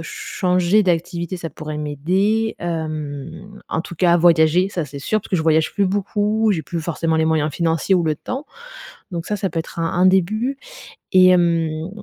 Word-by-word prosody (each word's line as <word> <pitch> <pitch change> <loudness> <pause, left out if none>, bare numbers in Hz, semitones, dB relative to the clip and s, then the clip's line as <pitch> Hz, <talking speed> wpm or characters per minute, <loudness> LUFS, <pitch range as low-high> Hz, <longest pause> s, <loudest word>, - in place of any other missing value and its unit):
changer 180 +2 +1
d'activité, 170 0 -1
ça 165 -2 -6
pourrait 155 +1 -7
m'aider, 185 +10 0
hem, 160 +3 -5
en 160 - -1
tout 170 - -8
cas, 175 -1 +4
voyager, 170 +1 +4
ça, 175 -5 -3
c'est 140 0 -9
sûr 215 +9 0
parce - - -13
que 185 - +1
je 160 - 0
voyage 160 -1 +2
plus 200 -2 +2
beaucoup. 210 +3 0
J'ai 160 -5 -2
plus 170 - -4
forcément 160 0 -1
les 160 - +2
moyens 155 -1 +1
financiers 165 +4 +1
ou 175 - +1
le 155 -1 +1
temps. 260 - -6 0.7
Donc 170 -1 -4
ça, 210 - -2
ça 195 -1 -2
peut 165 - -3
être 165 - -7
un 165 0 0
un - - +5
début 215 +8 +2 0.6
et 185 -1 +7
hem, 165 -3 +2
170 Hz, 190 wpm, -20 LUFS, 160-190 Hz, 0.7 s, et